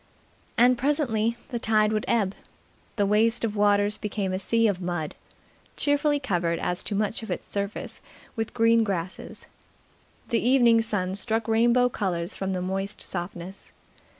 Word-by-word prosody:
And 245 +1 +5
presently 240 -5 +1
the 240 - -3
tide 215 -1 +2
would 215 - -1
ebb. 205 -5 +1 0.6
The 205 - +2
waste 220 +4 +2
of 215 -1 -3
waters 205 0 +3
became 205 -3 -3
a 185 - -1
sea 230 +3 +2
of 195 -3 -1
mud, 175 -4 -3 0.6
cheerfully 290 0 +2
covered 175 -9 0
as 180 +1 -2
to 205 - -2
much 210 +2 -1
of 220 - -8
its 180 - -4
surface 200 0 -4 0.3
with 225 -1 -3
green 230 -1 +4
grasses. 185 -4 -4 0.8
The 230 - +2
evening 240 -2 +5
sun 195 -5 -2
struck 220 +3 -1
rainbow 235 +2 +4
colours 180 -7 -2
from 190 0 -2
the 180 -1 -2
moist 195 +2 -3
softness. 180 +1 -7
210 Hz, 150 wpm, -26 LUFS, 190-230 Hz, 0.8 s, And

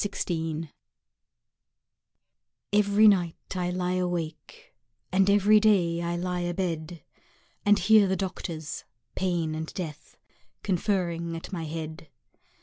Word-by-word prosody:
DOCTORS 165 -5 -2 2.1
EVERY 210 +1 +5
night 180 -5 +1
I 180 -1 -1
lie 180 0 -1
awake 180 - -4 0.4
And 190 +1 +3
every 205 +1 +5
day 180 -6 +3
I 170 0 -2
lie 180 +1 -2
abed 175 -2 -3 0.6
And 205 0 +6
hear 210 +1 +5
the 190 - +1
doctors, 170 -4 -5 0.3
Pain 175 -4 -1
and 160 0 -4
Death, 160 -5 -7 0.5
Conferring 175 -3 -1
at 165 - -9
my 165 -3 -3
head. 160 0 -6
175 Hz, 110 wpm, -27 LUFS, 165-195 Hz, 2.1 s, And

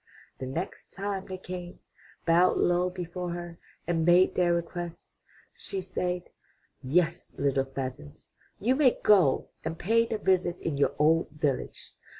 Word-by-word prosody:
The 130 - -4
next 165 +8 -5
time 195 -1 -3
they 185 - -5
came, 180 -1 -7 0.5
bowed 175 +2 +4
low 175 +1 +2
before 180 -1 -5
her, 175 -1 -7 0.3
and 165 -1 0
made 175 +2 +5
their 175 -1 +2
request, 170 0 -4 0.4
she 195 - -5
said: 180 -1 -2 0.6
*'Yes, 165 +5 +1
little 135 -1 +1
pheasants, 130 - -7 0.3
you 240 +6 +2
may 265 -3 +4
go 185 -11 +4
and 160 +1 -3
pay 230 +6 +2
the 225 - -2
visit 185 -3 +1
in 160 - -2
your 140 -1 +1
old 160 +3 +3
village. 145 -3 -2
175 Hz, 145 wpm, -28 LUFS, 160-185 Hz, 0.6 s, made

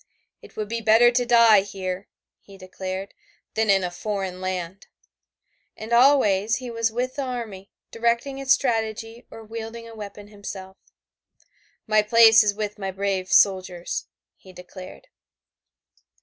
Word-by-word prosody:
"It - - -16
would 215 -1 -4
be 230 +2 -4
better 225 +2 +5
to 245 0 0
die 230 -4 +6
here," 190 -1 -6 0.3
he 195 -1 -16
declared, 190 +1 -7 0.4
"than 220 -1 0
in 195 -1 +4
a 180 - -3
foreign 190 -1 -4
land." 185 0 -5 0.9
And 220 +2 -6
always 230 -5 +4
he 250 0 -6
was 230 -1 -1
with 250 +3 -3
the - - -1
army, 230 -7 -6 0.2
directing 235 +4 -1
its 270 -1 -1
strategy 225 -2 -1
or 225 - -11
wielding 225 +1 -8
a 230 - -11
weapon 205 -1 -10
himself. 195 -2 -9 1.1
"My 215 0 +3
place 225 +1 +6
is 205 -1 0
with 210 -1 -5
my 195 -1 -3
brave 190 -1 -3
soldiers," 185 -3 +1 0.3
he 190 - -16
declared. 185 - -12
215 Hz, 140 wpm, -23 LUFS, 190-230 Hz, 1.1 s, die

